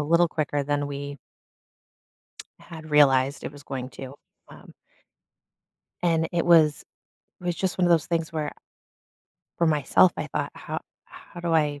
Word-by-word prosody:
little 170 +3 +3
quicker 145 -2 -1
than 145 0 -1
we 140 0 -6 1.4
had 155 -2 -11
realized 140 -2 +4
it - - -5
was 145 -1 -13
going 130 -1 -5
to, 135 +1 -9 0.3
um - - -14 1.3
And 165 -1 +2
it 170 - 0
was 160 -4 +4 0.6
it - - -13
was 175 -1 0
just 185 +2 -2
one 180 - +3
of - - +2
those 165 -3 +3
things 165 -2 -2
where 150 -2 -3 1.1
for 170 - +3
myself, 155 +4 +4
I - - -3
thought, - - -3
"How - - -5 0.2
how 175 - -13
do 170 -1 -1
I 145 -2 +1
155 Hz, 155 wpm, -25 LUFS, 145-170 Hz, 1.4 s, realized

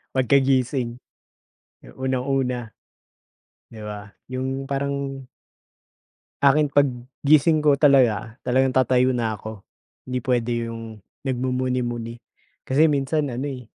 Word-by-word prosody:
Pagkagising, 130 -2 +1 1.0
unang-una, 130 -3 -1 1.0
'di 110 -2 -11
ba, 105 0 -7 0.2
'yong 130 +1 -3
parang 140 -1 -3 1.1
akin, 145 +1 +4
pag-gising 140 +3 +2
ko 145 - +6
talaga, 120 -6 +3
talagang 130 +1 +3
tatayo 130 0 +3
na 120 -3 0
ako, 110 -1 -9 0.4
'di 125 0 -3
puwede 120 -1 0 0.2
'yong 115 -2 -8 0.2
nagmumuni-muni, 125 -2 -2 0.4
kasi 140 +4 +3
minsan 145 0 +1
ano, 135 +4 -3
eh, 130 -3 -7
130 Hz, 95 wpm, -23 LUFS, 120-135 Hz, 1.1 s, ko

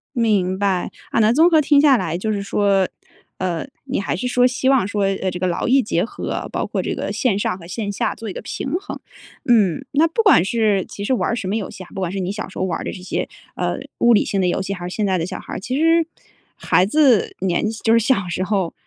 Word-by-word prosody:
明 205 -6 +1
白。 195 -2 0 0.2
啊 - - +1
那 215 0 +5
综 320 +6 +5
合 320 -2 +5
听 290 0 +4
下 285 -3 +6
来 165 -6 -2
就 215 +4 -2
是 205 -2 -2
说， 200 -1 +2 0.5
呃， 180 +4 -2 0.2
你 275 0 -2
还 195 - -2
是 250 - -3
说 250 0 +4
希 260 +1 0
望 265 -8 +3
说， 205 0 -1
呃， 195 -1 0
这 180 - -5
个 185 - -1
劳 175 - -1
逸 265 +2 +5
结 175 -4 0
合， - - -5
包 - - -1
括 - - -2
这 - - -3
个 - - -3
线 230 -7 +1
上 200 - -1
和 170 -3 -12
线 205 +3 -3
下 200 - -2
做 225 -1 -7
一 - - -5
个 - - -6
平 270 +3 -5
衡。 405 - -7 0.5
嗯， 225 -1 +3
那 305 +3 +4
不 450 +8 0
管 400 - +6
是 210 -3 +1
其 200 - -7
实 235 - 0
玩 250 - 0
儿 - - 0
什 210 - -4
么 195 - -1
游 205 - -4
戏 185 - -9
啊， 175 - -15
不 - - -6
管 185 -2 -1
是 195 - -3
你 185 +1 -2
小 210 +2 -5
时 - - -12
候 - - -1
玩 175 -3 -2
儿 - - -5
的 - - -3
这 - - -8
些， 180 - -3 0.3
呃， - - -1 0.2
物 235 0 +5
理 210 - +4
性 195 - -1
的 180 - +2
游 175 - 0
戏 195 +1 -3
还 175 -2 -6
是 180 - -6
现 215 - 0
在 190 -2 +1
的 165 - -1
小 185 +1 -5
孩 - - -9
儿， - - -3
其 255 +7 -3
实 330 +1 +3 0.5
孩 180 - +2
子 255 -1 +3
年 190 +3 0
纪 220 - -6
就 225 - +3
是 230 - +6
小 225 -5 +1
时 175 - -2
候， 190 -4 -1
205 Hz, 295 characters per minute, -20 LUFS, 185-245 Hz, 0.5 s, 下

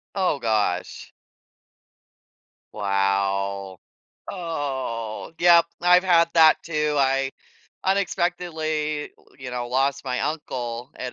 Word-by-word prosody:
Oh, 185 -7 +1
gosh. 105 -5 -1 1.6
Wow. 100 -1 -1 0.5
Oh, 135 - -4
yep, 170 -1 +6 0.2
I've 180 +1 +5
had 170 -2 +4
that, 160 -1 +7
too, 150 -2 -1
I 135 0 +2 0.5
unexpectedly 160 -5 -1
w - - -26
you 130 -1 -7
know, 125 -1 -3
lost 135 +2 0
my 125 -1 -2
uncle 125 -4 -4
at 125 -1 -5
140 Hz, 95 wpm, -24 LUFS, 115-165 Hz, 1.6 s, that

